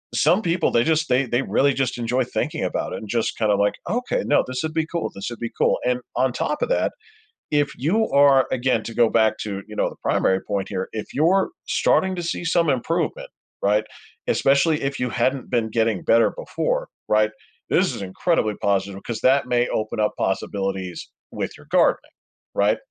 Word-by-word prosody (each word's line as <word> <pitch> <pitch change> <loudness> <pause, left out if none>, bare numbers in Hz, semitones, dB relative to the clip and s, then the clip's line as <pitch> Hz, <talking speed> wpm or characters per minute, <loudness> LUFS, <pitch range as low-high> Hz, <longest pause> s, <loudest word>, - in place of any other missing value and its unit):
some 195 +5 +3
people 170 -2 +1
they 115 - +3
just 160 -1 +1
they 130 +2 +3
they 120 +2 0
really 140 0 +2
just 130 -2 -1
enjoy 125 +2 0
thinking - - -3
about - - -2
it - - -3
and 105 - -10
just 115 -2 -1
kind 110 -2 +2
of 100 - +2
like, 100 0 +2 0.2
"Okay, 245 +4 -1
no, 145 - +3
this 130 0 -3
would 160 0 -3
be 160 -1 0
cool. 170 0 -3
This 100 +4 -5
would 120 - -8
be 115 -1 -4
cool." - - +2
And 125 0 +1 0.2
on 130 -1 +2
top 300 - -2
of 485 - 0
that, - - +1 0.6
if 145 -1 +1
you 210 - +1
are 140 -2 +5
again 125 -3 +1
to 115 - -6
go 115 -2 +4
back 110 -1 +3
to, 100 -2 -4
you 105 - -10
know, - - +1
the - - -12
primary 95 0 +2
point 100 -2 -3
here, 95 0 -3
if 110 - -6
you're 175 +6 +3 0.2
starting 190 0 +2
to 175 - -4
see 170 +1 -3
some 165 -2 +2
improvement, 160 +6 -1 0.3
right? 105 +2 +2 0.4
Especially 140 +3 +3
if 140 0 -2
you 125 -1 -1
hadn't 125 +2 -1
been 115 -3 0
getting 110 -3 0
better 115 0 +4
before, - - -2 0.2
right? 110 0 +3 0.4
This - - +2
is - - -7
incredibly 110 - 0
positive 100 -1 0
'cause 115 -2 -5
that 135 +1 +3
may 120 0 +2
open 110 0 -2
up 105 - +2
possibilities 95 -1 -3 0.2
with - - -4
your - - -16
gardening, - - +2 0.4
right? - - +2
125 Hz, 200 wpm, -23 LUFS, 110-155 Hz, 0.6 s, are